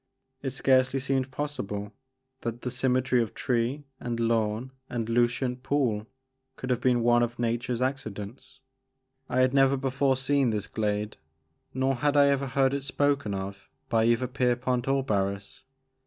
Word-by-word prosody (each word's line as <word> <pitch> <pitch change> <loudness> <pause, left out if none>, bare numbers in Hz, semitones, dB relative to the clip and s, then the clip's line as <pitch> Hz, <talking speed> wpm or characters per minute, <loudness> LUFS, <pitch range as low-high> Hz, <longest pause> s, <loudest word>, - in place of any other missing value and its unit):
It 135 - -2
scarcely 130 0 +2
seemed 135 -1 0
possible 105 -8 -4 0.5
that 115 0 -5
the 125 - -2
symmetry 130 0 +2
of 115 - -4
tree 125 +4 0 0.2
and 120 -1 -3
lawn 115 +1 0 0.2
and 115 -2 -2
lucent 125 +2 +1
pool 125 -6 0 0.5
could 130 - -4
have 125 -1 0
been 120 -2 +3
one 120 0 +4
of 120 0 -1
nature's 120 +1 -1
accidents. 125 -2 -5 0.7
I 130 - +2
had 130 0 +3
never 135 0 +4
before 135 0 +1
seen 135 -1 +2
this 105 -2 -1
glade 105 -1 -2 0.5
nor 130 +1 +1
had 145 +3 +1
I 140 0 +6
ever 140 0 +1
heard 135 0 +2
it 140 - -1
spoken 140 -5 0
of 95 +1 -6 0.2
by 115 -1 +3
either 120 +2 +3
Pierpont 125 -1 0
or 135 0 +2
Barris. 100 +3 -2
125 Hz, 155 wpm, -27 LUFS, 115-135 Hz, 0.7 s, I